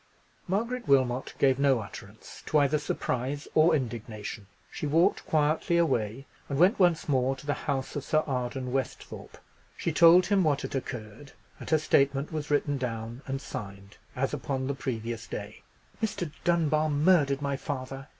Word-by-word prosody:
Margaret 230 Hz, +6 st, -2 dB
Wilmot 130 Hz, -2 st, +2 dB
gave 135 Hz, -1 st, +3 dB
no 140 Hz, -3 st, +3 dB
utterance 100 Hz, 0 st, -10 dB
to 155 Hz, -, +2 dB
either 145 Hz, +1 st, +3 dB
surprise 140 Hz, 0 st, -3 dB
or 160 Hz, +1 st, +5 dB
indignation. 110 Hz, -5 st, -5 dB, 0.2 s
She 150 Hz, -, -4 dB
walked 165 Hz, +4 st, +3 dB
quietly 155 Hz, +2 st, +2 dB
away, 130 Hz, -6 st, 0 dB, 0.2 s
and 140 Hz, -, -2 dB
went 185 Hz, -, +4 dB
once 175 Hz, -3 st, +3 dB
more 135 Hz, -2 st, +1 dB
to 130 Hz, -, -13 dB
the 145 Hz, -, 0 dB, 0.2 s
house 135 Hz, -2 st, -2 dB
of 145 Hz, -, -3 dB
Sir 155 Hz, +2 st, +1 dB
Arden 125 Hz, -1 st, -3 dB
Westhorpe. 135 Hz, -1 st, -5 dB, 0.4 s
She -, -, -1 dB
told 170 Hz, +2 st, +7 dB
him 195 Hz, 0 st, +2 dB
what 145 Hz, -3 st, +1 dB
had -, -, -5 dB
occurred; 125 Hz, 0 st, -6 dB, 0.3 s
and -, -, -8 dB
her 160 Hz, -, +4 dB
statement 140 Hz, -1 st, +2 dB
was 150 Hz, -2 st, -4 dB
written 145 Hz, -1 st, +1 dB
down 115 Hz, 0 st, -4 dB
and 135 Hz, 0 st, -2 dB
signed, 100 Hz, -6 st, -8 dB, 0.2 s
as 135 Hz, +2 st, -1 dB
upon 130 Hz, -1 st, -2 dB
the 140 Hz, -, -1 dB
previous 115 Hz, -4 st, -4 dB
day. 105 Hz, +1 st, -7 dB, 0.4 s
"Mr. 200 Hz, -7 st, -2 dB
Dunbar 155 Hz, -3 st, +2 dB
murdered 145 Hz, -2 st, +3 dB
my 140 Hz, -1 st, 0 dB
father!" 135 Hz, 0 st, -5 dB
140 Hz, 160 wpm, -28 LUFS, 125-155 Hz, 0.4 s, told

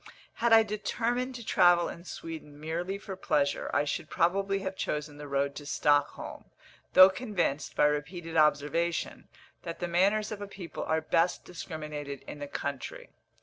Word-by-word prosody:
Had 235 Hz, 0 st, +3 dB
I 225 Hz, 0 st, +8 dB
determined 235 Hz, +4 st, -2 dB
to 235 Hz, -2 st, -8 dB
travel 175 Hz, -3 st, +5 dB
in 170 Hz, +1 st, -8 dB
Sweden 155 Hz, -4 st, -8 dB
merely 170 Hz, +5 st, -3 dB
for 200 Hz, -1 st, -7 dB
pleasure, 145 Hz, -6 st, 0 dB
I 145 Hz, -, +2 dB
should 155 Hz, -, -3 dB
probably 195 Hz, +3 st, +1 dB
have 190 Hz, 0 st, -4 dB
chosen 150 Hz, -4 st, -3 dB
the 145 Hz, 0 st, -8 dB
road 140 Hz, 0 st, 0 dB
to 145 Hz, -, -8 dB
Stockholm, 145 Hz, -1 st, 0 dB, 0.5 s
though 185 Hz, +1 st, +10 dB
convinced, 190 Hz, -, -2 dB
by -, -, +4 dB
repeated 165 Hz, +3 st, -2 dB
observation, 155 Hz, +2 st, +1 dB, 0.3 s
that 170 Hz, -, -6 dB
the 175 Hz, -, -3 dB
manners 200 Hz, +5 st, +2 dB
of 210 Hz, -1 st, -5 dB
a 205 Hz, -, -5 dB
people 185 Hz, -5 st, -7 dB
are 160 Hz, 0 st, +1 dB
best 165 Hz, +2 st, +1 dB
discriminated 150 Hz, -5 st, -6 dB
in 150 Hz, -, -9 dB
the 145 Hz, -, -5 dB
country. 140 Hz, -1 st, -5 dB
170 Hz, 160 wpm, -29 LUFS, 150-195 Hz, 0.5 s, though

